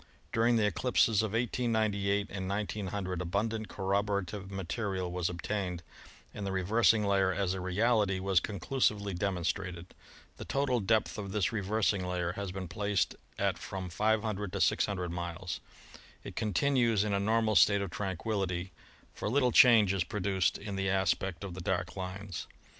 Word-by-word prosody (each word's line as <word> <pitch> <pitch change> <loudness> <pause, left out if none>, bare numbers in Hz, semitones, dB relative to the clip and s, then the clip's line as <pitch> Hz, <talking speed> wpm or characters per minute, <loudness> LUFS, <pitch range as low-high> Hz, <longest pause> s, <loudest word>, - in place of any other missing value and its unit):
During 115 +1 +3
the 110 -2 +3
eclipses 110 +1 +2
of 110 -2 -2
1898 110 -4 0
and 95 -1 -4
1900 100 -3 -3
abundant 110 +5 -1
corroborative 100 0 -1
material 95 -1 -3
was 90 -1 -1
ob 85 0 -7
tained, 90 -5 -2 0.5
and 105 - -6
the 100 - -2
reversing 105 +4 +3
layer'as 95 -1 +2
a 95 - -4
reality 100 +1 +2
was 95 -1 +3
conclusively 105 -1 -1
demonstrated. 90 -1 -2 0.4
The - - -7
total 135 -3 +1
depth 110 +1 +1
of 100 -2 -5
this 100 -3 +1
reversing 100 -2 0
layer 90 -1 -1
has 100 0 -5
been 95 -1 -5
placed 100 +2 0 0.2
at - - 0
from 95 -2 -6
500 105 0 0
to - - -2
600 90 -4 +1
miles. 85 +1 -4 0.6
It - - -8
continues 115 0 +2
in 105 -1 -1
a 100 - +2
normal 110 +1 +2
state 100 0 +5
of 95 - -5
tranquillity, 95 -2 -2 0.4
for - - -3
little 125 +1 +3
change 110 -6 +7
is 95 -3 +1
produced 95 -1 0
in 100 -1 -6
the 95 0 0
aspect 95 -1 0
of 95 -3 -5
the 95 - -7
dark - - -2
lines. 95 0 -5
100 Hz, 155 wpm, -31 LUFS, 95-105 Hz, 0.6 s, change